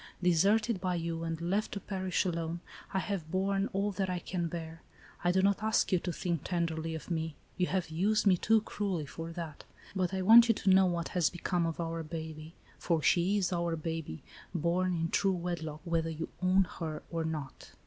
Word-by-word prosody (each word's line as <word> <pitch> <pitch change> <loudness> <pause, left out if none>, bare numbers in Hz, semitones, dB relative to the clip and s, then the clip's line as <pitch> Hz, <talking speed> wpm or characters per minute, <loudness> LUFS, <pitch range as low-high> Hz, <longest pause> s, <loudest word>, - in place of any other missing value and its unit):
Deserted 195 +5 +3
by 185 -1 0
you, 165 -1 -3
and 165 -1 -3
left 190 +5 -1
to 200 - -3
perish 190 -1 -1
alone, 170 -1 -2 0.3
I 195 - -1
have 190 -4 -2
borne 195 +2 0
all 200 +2 0
that 190 0 -2
I 180 - -1
can 175 0 -2
bear. 165 0 -6 0.4
I 175 - +4
do 190 +1 +2
not 200 0 +3
ask 220 +1 +2
you 185 - +4
to 175 - -3
think 170 -2 -2
tenderly 165 -2 -1
of 160 - -7
me,^ 160 -2 -2 0.2
you 180 -1 +1
have 180 -3 -1
used 205 +7 +2
me 195 -2 +6
too 220 +5 +3
cruelly 195 -7 -2
for 165 +3 -7
that; 165 -4 -6 0.3
but 185 -1 0
I 190 -1 -1
want 230 +4 +9
you 230 - +5
to 195 - +2
know 190 0 +6
what 170 -1 -1
has 175 -4 +2
become 175 -1 -1
of 165 - -4
our 165 0 -2
baby, 160 0 -7 0.2
for 165 -3 0
she 185 +4 +3
is 195 -1 0
our 170 -1 0
baby, 160 - -5 0.3
born 175 +2 +1
in 165 0 -1
true 195 +2 +2
wedlock, 165 -3 -4
whether 165 -2 0
you 160 0 -4
own 185 +1 +4 0.2
her 155 -2 -4
or 165 -1 -1
not. 155 -4 -5
175 Hz, 205 wpm, -31 LUFS, 165-190 Hz, 0.4 s, want